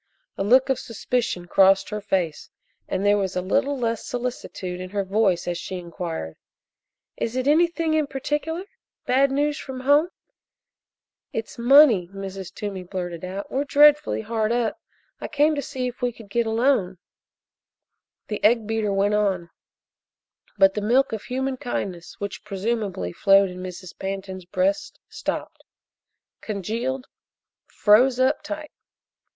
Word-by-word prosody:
A - - -2
look 255 +6 +4
of 265 - +1
suspicion 230 -5 -2
crossed 195 +2 +4
her 210 0 -4
face, 175 -6 -2 0.4
and 195 - -2
there 205 0 +4
was 190 -1 -2
a 180 - 0
little 280 +8 +1
less 230 -3 -1
solicitude 235 -7 -5
in 185 - -6
her 200 +1 -1
voice 190 -3 +1
as 175 -1 -2
she 185 - -5
inquired: 170 - -6 0.8
"Is 230 +1 -3
it 255 +1 -1
anything 330 +1 +3
in 310 -2 +2
particular? 295 +6 -2 0.4
Bad 270 +2 +3
news 290 +2 0
from 260 -2 -7
home?" 290 +5 +4 1.2
"It's 225 +1 -5
money!" 240 - +6
Mrs. 195 -1 -7
Toomey 200 -3 -5
blurted 175 -2 -5
out. 190 +2 -6
"We're 270 +2 0
dreadfully 295 -1 +5
hard 220 0 -1
up. 235 -2 -1 0.4
I - - -5
came 300 +1 +3
to 290 - -2
see 260 -2 -3
if 250 - -13
we 245 0 +1
could 225 -3 -15
get 235 +1 +1
a - - 0
loan." 220 -5 +1 1.3
The 210 - -4
egg 225 +1 +4
beater 220 -1 -1
went 200 +1 +2
on, 190 -5 0 1.1
but 195 -1 +5
the 210 - -2
milk 245 +5 +2
of 220 - -5
human 265 +1 -2
kindness 185 -8 -5
which, 200 -1 -5
presumably, 200 - -3
flowed 195 -1 +4
in 180 0 -8
Mrs. 185 0 -8
Pantin's 190 -1 -5
breast 190 +2 -1
stopped - - -5 0.8
congealed 230 +6 -3 0.6
froze 245 +5 +4
up 260 +4 +2
tight. 305 0 -6
215 Hz, 145 wpm, -24 LUFS, 190-260 Hz, 1.3 s, money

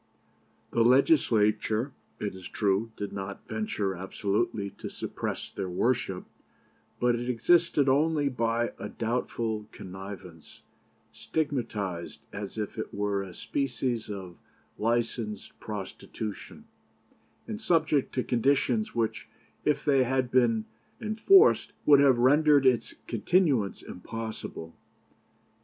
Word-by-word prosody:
The 115 - +2
Legislature, 115 -3 +3 0.3
it 105 - -3
is 95 -1 -9
true, 105 +2 0
did 100 -1 -4
not 100 0 -6
venture 105 -2 -2
absolutely 100 +2 -2
to - - -5
suppress - - -5
their 95 - -4
worship, 95 -1 0 0.7
but 120 0 +3
it 120 +1 -2
existed 150 +3 +3
only 145 +2 +3
by 120 -2 0
a - - -5
doubtful 115 -2 -2
connivance 95 -3 -10 0.5
stigmatized 110 - -3
as 100 +1 -6
if 105 -2 -4
it - - -4
were 100 -1 -1
a 95 -3 -8
species 125 -4 -2
of 95 -4 -7 0.4
licensed 115 -2 -2
prostitution, 105 0 -7 0.8
and 215 0 -5
subject 160 -8 +2
to 125 - +1
conditions 120 -3 +1
which, 115 -2 -1 0.4
if 150 - +1
they 135 -3 +4
had 130 0 0
been 115 -4 +3 0.3
enforced, 240 - +5
would 145 -2 +7
have 135 -3 +5
rendered 145 +3 +5
its 120 -3 +2
continuance 130 - +1
impossible. 110 -5 -7
115 Hz, 110 wpm, -28 LUFS, 100-135 Hz, 0.8 s, would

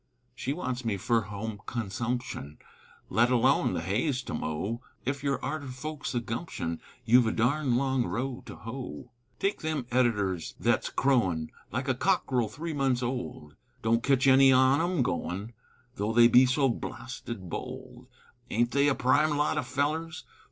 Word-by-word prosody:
She 130 +1 -3
wants 130 -5 -3
me 110 -4 -1
fer 115 +4 +2
home 105 +1 -6
consumption, 120 - -3 0.5
Let 120 +2 +3
alone 125 -2 +3
the 80 - -2
hay's 125 - 0
to - - -6
mow, 95 +10 -3 0.2
Ef 135 +2 -2
you're 140 -1 0
arter 155 -3 -3
folks 145 +2 -5
o' - - +3
gumption, 115 - -4 0.2
You've 120 +1 +5
a - - +2
darned 125 +2 +1
long 130 -2 +1
row 130 +1 -3
to - - -8
hoe. 115 - -7 0.3
Take 200 +1 -1
them 155 -5 -2
editors 105 -8 +1
thet's - - +1
crowin' 95 -13 +1 0.2
Like 130 +6 -2
a 130 - +3
cockerel 125 -2 +1
three 160 +8 -5
months 135 -3 +1
old, 85 - -4 0.3
Don't 115 +1 +3
ketch 135 +1 +2
any 135 0 +7
on 130 +3 +5
'em 175 -5 +1
goin', 100 +2 -3 0.4
Though 105 +2 -1
they 120 0 +8
be 125 +2 +6
so 135 +2 +3
blasted 120 -4 -5
bold; - - -7 0.4
Aint 120 +2 +1
they 140 +1 +3
a 140 - +3
prime 145 +3 +3
lot 150 +1 +1
o' - - +1
fellers? 150 +5 -2
125 Hz, 160 wpm, -29 LUFS, 110-135 Hz, 0.5 s, they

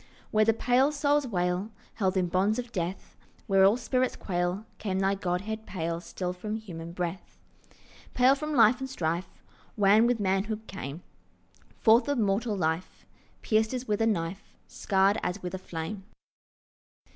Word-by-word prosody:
Where 215 0 +4
the 225 - +5
pale 250 +5 +2
souls 290 -1 +1
wail, 180 -1 -1 0.2
Held 190 -3 0
in 185 - +2
bonds 190 +5 +1
of 245 -1 -5
death, 180 -2 -4 0.3
Where 195 -1 +4
all 200 +4 +5
spirits 255 +1 0
quail, 180 +2 -2
Came 190 -3 -2
thy 195 +1 +2
Godhead 200 +4 -3
pale 170 -2 -3
Still 180 0 -4
from 210 +4 -5
human 170 -6 -8
breath— 175 +1 -5 0.8
Pale 255 +2 +6
from 305 +2 -3
life 235 +1 +6
and 265 0 -5
strife, 170 -6 -2 0.5
Wan 210 +3 +5
with 245 -2 +1
manhood, 205 +3 -1
came 160 -4 -7 0.7
Forth 225 +4 +5
of 285 - +1
mortal 210 0 0
life, 160 0 -2 0.4
Pierced 220 +2 +1
as 255 0 -5
with 210 0 0
a 225 - +3
knife, 190 -1 -3
Scarred 195 0 +2
as 180 +2 -3
with 180 0 -4
a 190 - -4
flame. 180 +3 -6
200 Hz, 155 wpm, -28 LUFS, 180-225 Hz, 0.8 s, Pale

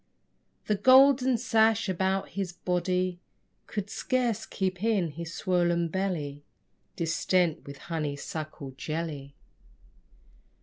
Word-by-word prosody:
The 215 - +1
golden 260 +2 +6
sash 225 -2 +3
about 190 +1 0
his 190 -3 -4
body 180 0 -1 0.5
Could 205 -2 -4
scarce 240 -2 -1
keep 185 -1 -2
in 200 -8 +1
his 165 +2 -7
swollen 175 -1 +1
belly 155 -6 -3 0.5
Distent 170 0 0
with 140 0 -8
honey 155 -3 -3
suckle 150 -1 -6
jelly. 145 0 -5
180 Hz, 100 wpm, -28 LUFS, 160-210 Hz, 0.5 s, golden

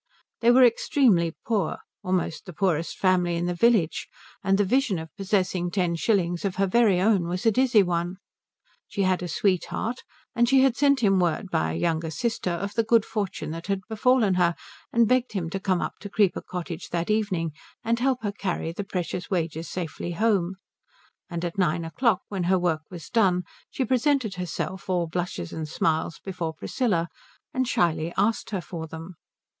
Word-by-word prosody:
They 235 - +4
were 255 +2 +7
extremely 225 - +3
poor; 215 -5 0 0.3
almost 185 -2 -1
the 180 - -7
poorest 170 -2 0
family 180 -2 +2
in 170 +1 -1
the 175 - 0
village, 200 -3 +2 0.4
and 195 0 +3
the 205 - +3
vision 240 -1 +1
of 160 -1 -8
possessing 185 -3 0
ten 175 -2 0
shillings 175 -2 +1
of 195 -2 -1
her 195 - +2
very 200 -2 +3
own 190 -3 +3
was 180 +4 -3
a 225 - +6
dizzy 240 -3 +4
one. 175 0 -1 0.7
She 200 - -1
had 185 -1 +2
a 180 - -3
sweetheart, 200 +7 -1 0.3
and 235 0 +3
she 270 0 +6
had 265 -3 +3
sent 280 -1 +3
him 195 -4 +4
word 180 +2 0
by 80 0 +1
a - - -3
younger 160 - 0
sister 185 +5 -2
of 195 +4 -3
the 230 - +2
good 225 -1 +3
fortune 195 -7 -3
that 165 +2 -6
had 195 -1 -1
befallen 225 -2 +3
her 170 -1 +3 0.4
and 230 -1 +4
begged 255 0 +1
him 170 -5 -3
to 195 - -2
come 185 -2 0
up - - -5
to 205 - -8
Creeper 200 -2 +2
Cottage 175 -2 -6
that 170 +3 -1
evening 190 -7 0 0.3
and 230 +1 +1
help 255 -2 +1
her 205 - 0
carry 185 -5 -3
the 190 +4 -4
precious 180 -2 -4
wages 165 -3 -2
safely 175 0 -4
home; 195 -2 +1 0.7
and 170 -1 -3
at 175 +3 -4
nine 170 -2 +1
o'clock 190 +3 +1
when 190 -4 -3
her 185 +1 +3
work 175 -3 0
was 175 -3 -9
done 190 -7 +2 0.3
she 260 - -2
presented 255 -3 +1
herself 180 +1 -4
all 180 -2 +1
blushes 170 - -4
and 155 -1 -4
smiles 160 +1 0
before 175 -4 -4
Priscilla 175 - 0 0.5
and 255 -1 0
shyly 165 -6 +1
asked 220 +1 +1
her 195 -4 -2
for 165 0 -6
them. 165 +3 -8
185 Hz, 185 wpm, -26 LUFS, 170-220 Hz, 0.7 s, were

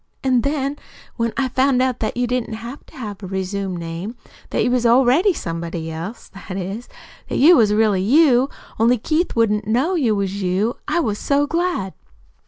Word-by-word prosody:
An' 255 -2 +3
then, 280 +1 -1 0.4
when 230 -1 -1
I 265 -1 +1
found 260 0 +2
that 250 -3 -1
you 245 - +1
didn't 245 -2 -2
have 235 +5 -8
to - - -16
have 210 -5 -6
a 190 - -6
resumed 190 0 -3
name, 170 +7 -6 0.3
that - - 0
you 245 - +1
was 250 -1 +1
already 260 - +4
somebody 165 - -4
else 170 +9 -7
that 195 -1 -7
is, 195 +6 -5 0.4
that - - -1
you 330 +6 +7
was 215 -7 +4
really 210 -3 +2
you, 265 - +4 0.3
only 235 +3 +4
Keith 315 +9 -1
wouldn't 210 -2 +1
know 255 +11 +1
you 255 - +2
was 200 0 -2
you, 195 +6 0
I 345 - +1
was 210 -7 -2
so 285 +1 +2
glad." 330 - -1
230 Hz, 185 wpm, -20 LUFS, 195-265 Hz, 0.4 s, you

